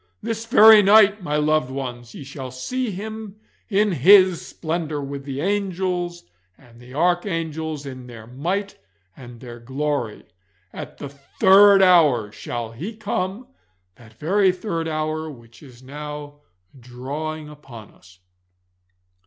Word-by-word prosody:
This 225 0 -4
very 220 -3 +8
night, 210 0 +5
my 150 -4 -3
loved 155 -3 +1
ones, 125 -3 -7
ye - - -8
shall 135 -1 -8
see 240 - -4
Him 215 +1 -7 0.3
in 205 0 +2
His 185 +3 +5
splendour, 160 -2 -4
with 140 0 -6
the 140 0 -5
angels 185 -2 -2 0.3
and 120 -3 -20
the 125 +2 -13
archangels 160 -3 -1
in 130 -2 -9
their 115 -3 -11
might 175 - -4 0.4
and 120 -3 -12
their 120 -1 -10
glory. 135 -2 -3 0.5
At - - -9
the 140 - -7
third 195 +8 +5
hour 150 - +4
shall 115 +1 -6
He 175 - -7
come 200 +1 -3 0.5
that 110 +2 -18
very 185 - +2
third 180 -3 -4
hour 155 0 -3
which 115 -4 -15
is 130 -4 -16
now 145 +1 -8 0.4
drawing 145 +6 -6
upon 135 -8 -13
us. 95 0 -21
155 Hz, 130 wpm, -22 LUFS, 130-190 Hz, 0.5 s, very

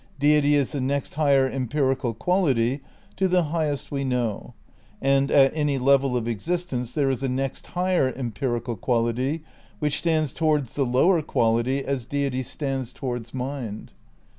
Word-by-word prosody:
Deity 145 0 +4
is 140 -3 +1
the 145 -3 -2
next 140 +2 -2
higher 140 -3 +3
empirical 130 -2 -1
quality 135 - +1 0.4
to 190 - +2
the 180 -1 +3
high 160 0 -1
est 145 -2 -5
we 140 -1 -1
know; 125 -3 -2 0.4
and... 135 0 +2
at 135 -1 +5
any 150 -3 +1
level 135 -1 +3
of 115 -1 -3
existence 125 - -2
there 140 -3 +2
is 130 - -3
a 135 - -1
next 135 +1 -3
higher 180 -7 +2
empirical 120 -1 -2
quality 125 - 0 0.3
which 150 -1 0
stands 155 -5 0
towards 150 -6 0
the 140 -3 0
lower 160 +8 +3
quality 120 0 +1
as 130 -4 -2
deity 140 -2 -1
stands 135 -1 -4
towards 120 -3 -5
mind.'" 125 -5 -5
135 Hz, 155 wpm, -24 LUFS, 125-145 Hz, 0.4 s, at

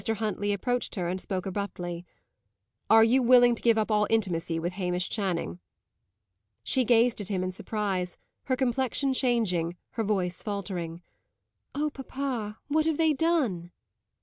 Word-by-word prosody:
Huntley 215 -2 -1
approached 245 +5 -1
her 180 -4 -2
and 185 +2 -2
spoke 185 -2 -3
abruptly. 180 -3 -4 0.8
"Are 225 0 +8
you 245 +4 +4
willing 245 0 +6
to 235 - -7
give 230 -2 +4
up 220 0 0
all 210 -1 +3
intimacy 175 -7 0
with 170 +2 -2
Hamish 180 -1 -2
Channing?" 175 - -2 1.0
She 260 - +2
gazed 235 -1 +3
at 200 - -5
him 190 -3 -1
in 185 - -2
surprise, 190 -2 -3 0.3
her 260 - +1
complexion 265 +1 0
changing, 210 -10 +1 0.2
her 225 - -2
voice 185 -4 -1
faltering. 180 -5 -4 0.7
"Oh, 300 +1 0
papa! 255 -6 -4
what 310 +2 +2
have 320 -2 +1
they 320 -2 +3
done?" 270 - 0
210 Hz, 150 wpm, -28 LUFS, 180-245 Hz, 1.0 s, Are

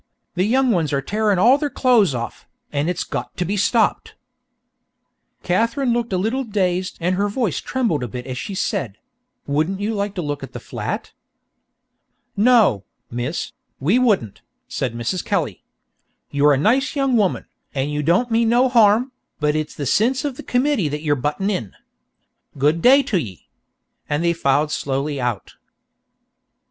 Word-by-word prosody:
The 185 +1 +1
young 255 +3 +2
ones 165 -7 +1
are 140 - +1
tearin' 210 -1 +1
all 245 +9 +5
their 295 -1 -1
clo'es 235 - +3
off, 120 -1 -6 0.2
an' 145 +3 0
it's 180 - -1
got - - -6
to 180 - -1
be 200 +4 -1
stopped!" 225 +3 +1 1.3
Katherine 230 +7 +1
looked 235 -1 -2
a 185 - +1
little 225 +8 -1
dazed 185 -5 -1
and 180 +2 0
her 200 +2 0
voice 210 - -1
trembled 230 - -1
a 125 - -3
bit 125 +2 -7
as 130 - -5
she 190 +10 -5
said: 115 - -2 0.5
"Wouldn't 155 +7 -1
you 210 +2 -1
like 200 -1 -2
to 180 - -3
look 145 -1 -3
at - - -9
the - - -6
flat?" - - -5 1.2
"No, 215 - +4 0.3
Miss, 125 +7 -3 0.3
we 180 - +2
wouldn't," 205 - +1 0.3
said 125 -3 -3
Mrs. 120 +10 -2
Kelly. - - -2 0.7
"You're 145 +1 +4
a - - +2
nice 250 - +2
young 275 -3 +1
woman, 205 -5 +1 0.3
and 135 +2 -1
you 150 0 -1
don't 180 - +2
mean 225 0 +3
no 245 +2 +4
harm, 230 +1 +4 0.3
but 150 0 +1
it's 155 0 -3
the 145 - -4
sinse 245 - +1
av 280 -3 -2
the - - -8
committee 250 - +1
that 150 +1 -4
you're 145 -2 +2
buttin' 150 +9 -1
in. 115 - -4 0.8
Good 150 +4 +2
day 275 +6 +6
to 200 -8 0
ye." 100 - -8 0.6
And 150 +3 0
they 170 - +3
filed 150 -1 +1
slowly 140 0 -2
out. 120 -5 -3
185 Hz, 170 wpm, -21 LUFS, 145-230 Hz, 1.3 s, day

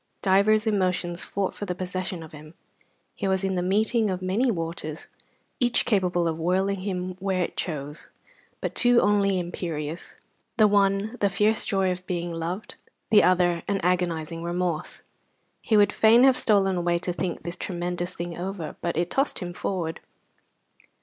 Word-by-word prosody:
Divers 210 +3 +4
emotions 185 -4 0
fought 195 -1 -2
for 205 - -6
the 180 -2 -3
possession 185 -1 -4
of 160 - -12
him. 155 +2 -12 0.6
He 200 - -3
was 190 0 +1
in 195 0 0
the 180 - 0
meeting 215 +4 +2
of 185 -1 -2
many 195 +8 +1
waters, 165 -5 -4 0.5
each 245 -2 +2
capable 180 -6 +1
of 160 0 -2
whirling 190 +3 0
him 185 -2 -3
where 190 -1 0
it - - -5
chose, 150 -2 -5 0.5
but - - -3
two 245 -1 +4
only 200 -2 +2
imperious: 170 -2 -5 0.4
the 215 -2 +6
one 200 +1 +2
the 200 - +2
fierce 210 +3 +1
joy 190 -2 +1
of 180 0 -6
being 175 -1 -3
loved; 175 +7 -5 0.3
the 210 - +7
other 175 -2 +3
an 200 -1 0
agonizing 170 -2 -1
remorse. 175 -1 -3 0.6
He 220 - +2
would 205 0 +4
fain 225 +3 +6
have 265 -1 +6
stolen 195 -5 +2
away 175 0 +1
to 180 +1 -2
think 180 0 -3
this 170 +1 -4
tremendous 175 0 -3
thing 170 0 -5
over, 180 -2 -5
but 170 -2 -2
it 170 +1 0
tossed 275 +2 +1
him 175 -2 -5
forward. 175 -3 -3
185 Hz, 165 wpm, -25 LUFS, 175-200 Hz, 0.6 s, the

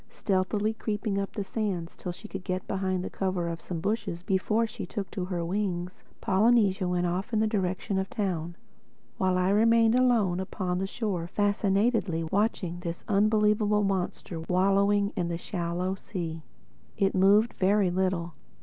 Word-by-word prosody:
Stealthily 205 +3 0
creeping 210 -2 -2
up 195 - -3
the 205 - -3
sands 195 -5 -3
till 180 - -5
she 215 +5 -10
could 195 -2 -7
get 185 0 -3
behind 185 -1 -1
the - - -4
cover 185 -3 -1
of 165 -1 -4
some 175 -3 -5
bushes 195 -2 -2
before 210 +4 +1
she 220 +1 -7
took 200 -5 -5
to 185 -4 -3
her 175 -2 -3
wings, 180 -1 -3 0.2
Polynesia 200 -1 +3
went 180 0 0
off 185 +6 -2
in 220 - +1
the 220 - +3
direction 190 -2 -1
of 190 - -3
the - - -14
town; 175 -6 -2 0.6
while 185 -1 +2
I 185 +1 +2
remained 225 +2 +4
alone 235 -8 +3
upon 185 -1 -2
the 190 - -1
shore 195 -6 -3
fascinatedly 200 -2 +1
watching 185 -1 -1
this 170 -1 -5
unbelievable 210 0 +3
monster 185 -3 -2
wallowing 195 +4 +2
in 175 - -1
the 170 -1 -2
shallow 175 +1 -2
sea. 170 -4 -5 0.6
It 195 -1 +2
moved 200 +4 +4
very 195 -1 +2
little. 180 -2 -1
190 Hz, 165 wpm, -28 LUFS, 180-210 Hz, 0.6 s, remained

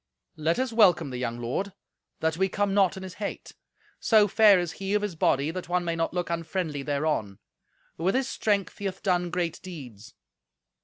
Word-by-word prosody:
"Let 160 +2 0
us 255 -2 -1
welcome 175 - +4
the 125 - -4
young 120 -1 -3
lord, 155 +12 -3 0.5
that 160 0 +1
we 190 +3 +1
come 205 0 0
not 195 -1 +3
in 190 - -7
his 185 -1 -7
hate. 200 - -5 0.5
So 215 -2 +5
fair 210 -1 +6
is 175 -2 -1
he 195 +2 -3
of 210 - +1
his 205 -3 -2
body 145 -1 +2
that 180 0 -6
one 180 0 0
may 170 -1 -1
not 165 0 -1
look 175 -1 -2
unfriendly 165 -3 -2
thereon; 140 -8 -1 0.6
with 185 +7 +1
his 265 0 +1
strength 200 -7 -1
he 205 - -5
hath 190 0 -4
done 180 -2 +1
great 175 -1 -2
deeds." 125 - -10
175 Hz, 195 wpm, -27 LUFS, 155-195 Hz, 0.6 s, fair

